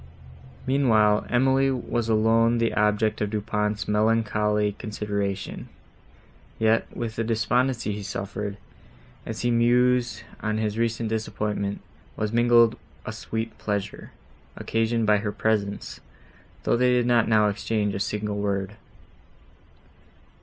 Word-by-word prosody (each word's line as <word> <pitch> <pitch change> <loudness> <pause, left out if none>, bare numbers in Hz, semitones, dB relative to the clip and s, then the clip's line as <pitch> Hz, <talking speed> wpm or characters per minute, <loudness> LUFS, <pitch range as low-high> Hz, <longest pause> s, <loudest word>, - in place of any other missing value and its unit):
Meanwhile, 110 -6 +3
Emily 135 +2 +3
was 120 -3 -2
alone 115 +2 +3
the 115 0 +1
object 105 +1 +1
of 105 - 0
Du 105 0 -1
Pont's 105 0 -2
melancholy 105 -1 +1
consideration; 100 -2 -4 0.9
yet, 110 0 +2
with 115 -2 -4
the 115 - 0
despondency 115 +1 0
he 105 0 -4
suffered, 100 +1 -5 0.7
as 110 -1 -4
he 120 - +1
mused 120 +1 +2 0.2
on 110 0 -1
his 105 -1 -1
recent 115 -1 -1
disappointment, 105 -2 -2 0.4
was 105 +1 -2
mingled 120 -1 +4 0.3
a - - -4
sweet 115 0 -5
pleasure, 100 -2 -4 0.5
occasioned 115 0 0
by 105 0 +4
her 105 0 -2
presence, 105 -1 -2 0.6
though - - +2
they 125 +1 +3
did 125 -1 +2
not 120 -2 +3
now 110 -1 +4
exchange 105 0 -1
a - - -3
single 105 +1 -2
word. 100 0 -2
110 Hz, 125 wpm, -25 LUFS, 105-115 Hz, 0.9 s, mingled